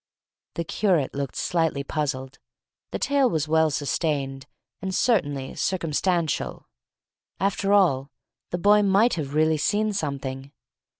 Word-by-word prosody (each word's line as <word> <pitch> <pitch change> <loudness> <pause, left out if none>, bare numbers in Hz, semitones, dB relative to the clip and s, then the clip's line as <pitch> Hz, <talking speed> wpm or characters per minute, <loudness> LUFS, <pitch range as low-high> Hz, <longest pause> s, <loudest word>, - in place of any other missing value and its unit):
The 170 - -1
curate 170 -5 +1
looked 140 -2 -4
slightly 160 -5 0
puzzled. 135 -2 -3 0.5
The - - -3
tale 280 -2 +2
was 160 -6 -1
well 160 0 +3
sustained, 140 -2 -2 0.3
and 190 -1 -3
certainly 145 - +1
circumstantial. 170 -2 -1 0.7
After 195 0 0
all, 150 -10 +3 0.4
the 175 - -2
boy 205 +3 +5
might 205 +4 +4
have 145 -3 -3
really 155 0 +3
seen 210 +7 +1
something. 140 -5 -4
160 Hz, 120 wpm, -25 LUFS, 140-195 Hz, 0.7 s, boy